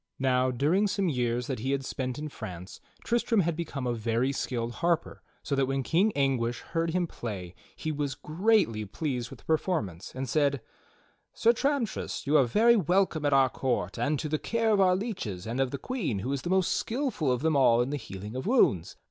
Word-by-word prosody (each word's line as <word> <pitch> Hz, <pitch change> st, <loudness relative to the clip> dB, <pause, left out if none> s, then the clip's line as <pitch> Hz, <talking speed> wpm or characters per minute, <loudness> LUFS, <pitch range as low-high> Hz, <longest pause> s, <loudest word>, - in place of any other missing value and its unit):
Now, 130 Hz, -1 st, +2 dB
during 155 Hz, -, +2 dB
some 195 Hz, -2 st, 0 dB
years 125 Hz, -3 st, 0 dB
that 130 Hz, -2 st, -3 dB
he 130 Hz, +5 st, -1 dB
had 135 Hz, -1 st, -2 dB
spent 130 Hz, -1 st, -3 dB
in 150 Hz, +1 st, -4 dB
France, 90 Hz, -8 st, -8 dB, 0.2 s
Tristram 235 Hz, -2 st, +2 dB
had 170 Hz, -1 st, 0 dB
become 150 Hz, -5 st, -4 dB
a 120 Hz, -, 0 dB
very 115 Hz, +3 st, 0 dB
skillful 120 Hz, -4 st, -3 dB
harper, 170 Hz, -1 st, 0 dB, 0.2 s
so -, -, -3 dB
that 135 Hz, -1 st, +2 dB
when 135 Hz, 0 st, -1 dB
King 190 Hz, -, +2 dB
Anguish 125 Hz, -4 st, 0 dB
heard 165 Hz, 0 st, -2 dB
him 175 Hz, +1 st, +1 dB
play 100 Hz, -, -6 dB, 0.2 s
he 155 Hz, -, -3 dB
was 145 Hz, -2 st, -2 dB
greatly 160 Hz, -, +1 dB
pleased 125 Hz, +2 st, -3 dB
with -, -, -10 dB
the -, -, -27 dB
performance, 150 Hz, -, -1 dB
and 130 Hz, +1 st, -3 dB
said: 140 Hz, 0 st, +1 dB, 0.7 s
"Sir 235 Hz, -, +4 dB
Tramtrist, 275 Hz, -2 st, -1 dB
you 145 Hz, +2 st, +2 dB
are 140 Hz, -4 st, +6 dB
very 225 Hz, -, +4 dB
welcome 180 Hz, -4 st, +1 dB
at 145 Hz, -, +2 dB
our 135 Hz, -1 st, +5 dB
court 120 Hz, -8 st, -2 dB
and 150 Hz, +1 st, +1 dB
to 155 Hz, -, -3 dB
the 155 Hz, 0 st, -1 dB
care 230 Hz, -1 st, 0 dB
of 205 Hz, -2 st, +4 dB
our 185 Hz, -1 st, +5 dB
leeches, 185 Hz, -, -4 dB
and 115 Hz, +3 st, -3 dB
of 135 Hz, -1 st, +2 dB
the 140 Hz, -, -4 dB
Queen 185 Hz, -, -2 dB
who 125 Hz, +8 st, -2 dB
is 140 Hz, -, -2 dB
the 175 Hz, -, -4 dB
most 190 Hz, -1 st, +2 dB
skillful 235 Hz, -, -1 dB
of 125 Hz, +2 st, -1 dB
them 160 Hz, -1 st, +2 dB
all 125 Hz, -4 st, +5 dB
in 125 Hz, +3 st, 0 dB
the 145 Hz, -, -1 dB
healing 105 Hz, -2 st, -8 dB
of 130 Hz, +8 st, -4 dB
wounds. 100 Hz, -, +3 dB
140 Hz, 210 wpm, -28 LUFS, 120-175 Hz, 0.7 s, are